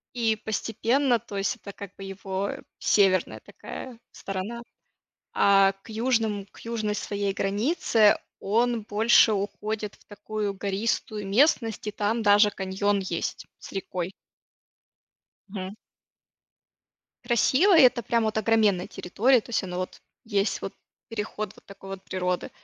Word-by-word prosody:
И 225 -2 +1
постепенно, 230 +4 +1
то 205 -3 -7
есть 195 - 0
это 200 - -10
как 200 -1 -10
бы 195 - -9
его 195 0 -3 0.3
северная 190 -3 +2
такая 250 -3 -9
сторона. 200 +5 -5 0.7
А, 195 -1 +5
к - - -15
южным 220 -3 0
к - - -16
южной 220 -3 -2
своей 200 -1 -2
границе 210 - +3 0.2
он 230 +3 +1
больше 220 +2 +5
уходит 210 +1 -3
в - - -27
такую 205 0 -4
гористую 205 +1 -2
местность, 225 -1 +2
и - - -1
там 215 +3 -1
даже 205 +1 +6
каньон 195 +1 0
есть 180 -3 -3
с - - -11
рекой. 185 -1 -4 1.4
Мгм. 190 0 -6 1.5
Красиво, 265 - +4
и - - +9
это 245 -1 +5
прям 230 +1 +1
вот 220 - -1
огроменная 215 -4 +2
территория, 235 +7 +2
то 235 - -14
есть 225 - +1
оно 180 -1 -5
вот 185 - -5 0.2
есть 205 -2 0
вот - - -6 0.3
переход 215 -2 -4
вот - - -19
такой 195 -1 -11
вот 195 -1 -7
природы. 180 -1 -2
210 Hz, 135 wpm, -26 LUFS, 195-225 Hz, 1.5 s, и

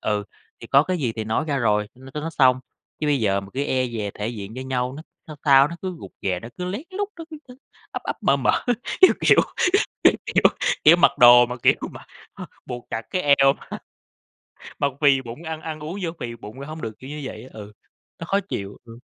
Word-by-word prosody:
Ừ. 105 -1 -1 0.4
Thì - - -9
có 140 - +5
cái 185 +3 -2
gì 120 -6 -1
thì 110 - -3
nói 110 +6 -1
ra 140 - 0
rồi, 105 -4 +1
n 130 - -14
cho 150 - -3
nó 165 +2 -4
xong. 130 -4 +3 0.4
Chứ 150 - -1
bây 145 -3 +2
giờ 100 -2 +1
mà 95 - -11
cứ 140 - -2
e 130 -2 0
dè 110 -4 -4
thể 105 +1 -4
diện 105 -3 -7
với 130 - -6
nhau, 125 -1 -2
nó 155 - -8 0.2
sao 155 -2 -9
sao 140 -1 +6
nó 170 - -7
cứ 185 -2 -4
rụt - - -10
rè, 90 -2 -1
nó 115 - -9
cứ 180 - -3
lén 190 +8 -4
lút, 400 +2 -3
nó 330 - -7
cứ, 310 - -7
ư, 250 -1 -14 0.4
ắp - - -5
ắp - - -4
mở - - +3
mở, - - +1 0.4
kiểu 375 - +8
kiểu - - +5 0.7
kiểu - - +7
kiểu - - +1 0.4
kiểu 155 +3 +8
mặc - - +5
đồ 120 0 +9
mà, 125 +1 -6
kiểu - - +6 0.2
mà - - -12 0.3
h - - -10 0.2
buộc 120 -1 -7
chặt 115 - -3
cái 185 - -1
eo 135 -2 +5
mà - - -9 1.0
mà 140 - +2
phì 140 -3 +4
bụng, 120 +6 -9
ăn 160 -1 -5
ăn 155 -1 -6
uống 165 +6 -6
vô 170 - -1
phì 115 -1 -5
bụng 115 +4 -11
ra 140 - -7
hông 155 +1 -8
được, 110 -2 -6
kiểu 130 +2 -10
như 150 - -6
vậy - - -7
á. 130 - -14
Ừ, 105 -1 -10 0.5
nó 165 - -7
khó 195 +3 +1
chịu. 100 0 -5
Ừm. 115 0 -13
130 Hz, 250 wpm, -23 LUFS, 115-155 Hz, 1.0 s, đồ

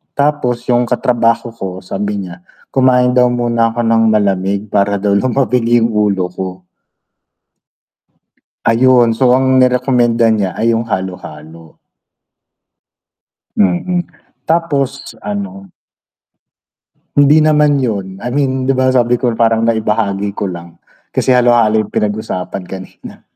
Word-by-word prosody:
Tapos 140 -4 0
yung 120 0 +2
katrabaho 120 -1 0
ko 115 -4 -7
sabi 100 +2 -4
niya, 90 -1 -10 0.2
kumain 125 -1 +2
daw 125 - +5
muna 115 -1 0
ako 120 - -5
ng 115 0 +2
malamig 100 -1 0
para 100 0 0
daw 105 - 0
lumamig 125 +1 0 0.2
yung 115 - +1
ulo 100 -4 0
ko. 90 0 -7 2.0
Ayun, 120 0 +4
so 125 +3 +1
ang 130 0 +2
nirekomenda 125 -2 +2
niya 100 -4 -1
ay 115 +1 +1
yung 115 0 -1
halo-halo. 85 -5 -7 1.8
Mm, 105 - +1 0.5
tapos 140 -5 -1
ano 100 -2 -6 1.5
Hindi 145 +2 +4
naman 150 -2 +3
yun, 100 -7 -3
I 125 - -3
mean, 130 -2 -1
'di 135 - +2
ba 130 0 +1
sabi 125 -1 +1
ko 125 - +1
parang 115 -1 +2
naibahagi 105 -3 -1
ko 100 -1 -3
lang, 85 -1 -10 0.3
kasi - - -1
halo-halo 120 -3 +3
yung - - -18
pinag-usapan 105 -3 -3
kanina. 95 0 -11
115 Hz, 120 wpm, -14 LUFS, 100-125 Hz, 2.0 s, daw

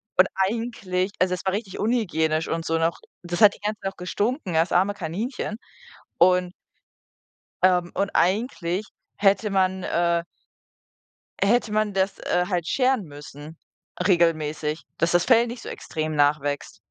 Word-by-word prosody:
Und 185 +1 +6
eigentlich 195 -2 -1
also, 185 0 +2
es 180 - -4
war 190 - +2
richtig 205 -2 -4
unhygienisch 165 -9 0
und 165 0 -2
so 165 0 0
noch, 165 0 0 0.2
das 175 +2 -4
hat 205 -1 +7
die - - -19
ganze 215 0 -2
Zeit 195 - -2
auch - - -42
gestunken, 205 - -2
das 165 +2 +2
arme 190 +3 +3
Kaninchen. 205 - -4 0.6
Und 180 0 +4 1.1
ähm, 180 -2 +3
und 200 0 0
eigentlich 195 -1 0 0.3
hätte 200 +1 +2
man, 190 -1 +1
äh 170 0 +1 1.2
hätte 220 +2 +2
man 215 -1 +1
das, 190 +1 0
äh, 180 0 0
halt 175 -3 -1
scheren 255 -5 +1
müssen 145 +1 -11 0.5
regelmäßig, 155 -3 +1 0.2
dass 170 +1 +1
das 175 0 +3
Fell 240 -1 +5
nicht 240 0 -7
so - - -8
extrem 155 -1 -4
nachwächst. 145 -1 0
185 Hz, 150 wpm, -24 LUFS, 165-205 Hz, 1.2 s, hat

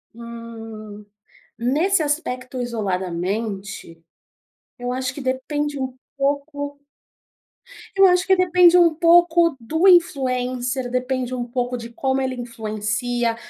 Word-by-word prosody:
Hum. 225 -3 -9 0.5
Nesse 310 +11 +1
aspecto 255 -4 -3
isoladamente, 195 -3 -3 0.8
eu 245 0 -4
acho 255 0 -2
que 285 - -8
depende 285 +3 -2
um 260 -1 -3 0.2
pouco 285 +1 -2 1.2
eu 390 - +7
acho 360 +1 +3
que 380 - +5
depende 360 -1 +5
um 335 -2 +5
pouco 335 -1 +4
do 320 +11 +1
influencer, 255 -7 +2
depende 255 0 -2
um 245 -1 -2
pouco 245 0 -2
de 230 0 -8
como 265 +3 -1
ele 260 -1 -2
influencia. 230 0 -2
255 Hz, 110 wpm, -22 LUFS, 230-295 Hz, 1.2 s, eu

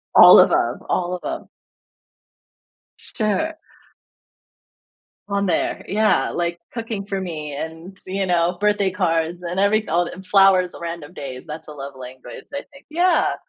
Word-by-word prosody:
All - - +10
of - - +6
'em, - - +1
all 180 0 0
of - - -4
'em. - - -22 1.5
Sure. 315 +10 -2 1.7
On 200 0 0
there, 180 - -1
yeah, 215 +1 +2
like 170 0 -2
cooking 225 -4 -4
for 195 -1 -3
me 155 -5 -5
and, 160 +5 -7
you 195 +1 -1
know, 175 0 +1
birthday 205 -1 +2
cards 175 -2 -1
and 175 +2 -3
every 210 +2 +2
all 175 +2 +1
and 190 +2 -9
flowers 190 -2 +4
on - - -11
random 170 -1 -6
days. 130 -6 -7
That's 160 0 -8
a - - -8
love 140 -1 -8
language, 130 0 -10
I 280 0 -4
think, 275 0 -17
yeah. 350 +3 +2
180 Hz, 150 wpm, -21 LUFS, 165-205 Hz, 1.7 s, All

